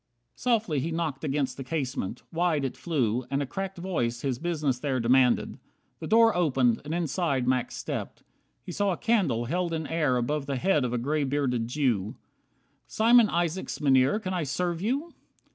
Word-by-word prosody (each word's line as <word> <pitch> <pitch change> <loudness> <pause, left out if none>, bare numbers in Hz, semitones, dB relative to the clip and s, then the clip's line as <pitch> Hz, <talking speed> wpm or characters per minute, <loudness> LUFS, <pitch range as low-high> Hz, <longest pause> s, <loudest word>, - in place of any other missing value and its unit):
62 - - -21
Softly 210 -11 +1
he 160 +6 -2
knocked 160 -4 -3
against 140 -3 -1
the 135 - -5
casement, 130 -7 -3
wide 165 -4 +1
It 130 - -4
flew, 130 -8 -1
and 140 +1 0
a 145 - -1
cracked 195 +6 -5
voice 120 -10 -2
his 130 -3 -2
business 155 -7 -1
there 135 -2 -1
Demanded. 125 +1 +2 0.4
The - - -6
door 225 0 +5
opened, 130 -9 +2
and 150 - -6
inside 160 -5 -1
Max 130 -1 0
stepped. - - -5 0.4
He - - -7
saw 200 +1 0
a - - -5
candle 170 - +1
held 170 +5 -1
in 160 -1 -2
air 150 -5 +1
Above 140 +4 -1
the 140 - -1
head 150 0 +2
of 120 - -2
a - - +1
gray 145 +5 0
bearded 130 -4 0
Jew. 120 -7 0 0.7
"Simeon 230 0 +5
Isaacs, 175 +1 -2
Mynheer, 135 +5 +3
can 185 -3 -4
I 180 - -1
serve 170 +3 -2
You?" 280 - -2
150 Hz, 180 wpm, -27 LUFS, 130-175 Hz, 0.7 s, door